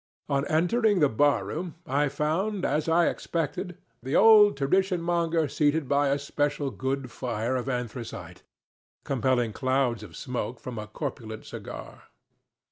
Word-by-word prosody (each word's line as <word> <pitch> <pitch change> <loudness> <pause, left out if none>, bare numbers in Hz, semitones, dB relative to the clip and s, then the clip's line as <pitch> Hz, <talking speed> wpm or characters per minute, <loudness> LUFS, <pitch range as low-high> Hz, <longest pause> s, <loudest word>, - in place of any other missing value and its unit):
On 140 0 0
entering 205 +7 +2
the 150 - +5
bar 145 +5 +2
room, 170 +1 -5
I 145 -1 +1
found, 180 +8 -1
as 155 +2 0
I 170 +1 +4
expected, 165 +2 -3 0.2
the 130 +3 -2
old 210 -5 +7
tradition 185 +6 +1
monger 170 -2 +1
seated 145 +1 +1
by 145 +1 +2
a 140 +1 +2
special 145 0 -1
good 130 -1 -3
fire 120 0 -2
of 130 +1 -2
anthracite, 125 -2 -5 0.6
compelling 125 -4 +1
clouds 130 -3 0
of 95 -7 -11
smoke 120 +1 -4
from 120 -3 -6
a 105 - -6
corpulent 110 -3 -6
cigar. - - -9
140 Hz, 140 wpm, -27 LUFS, 125-165 Hz, 0.6 s, old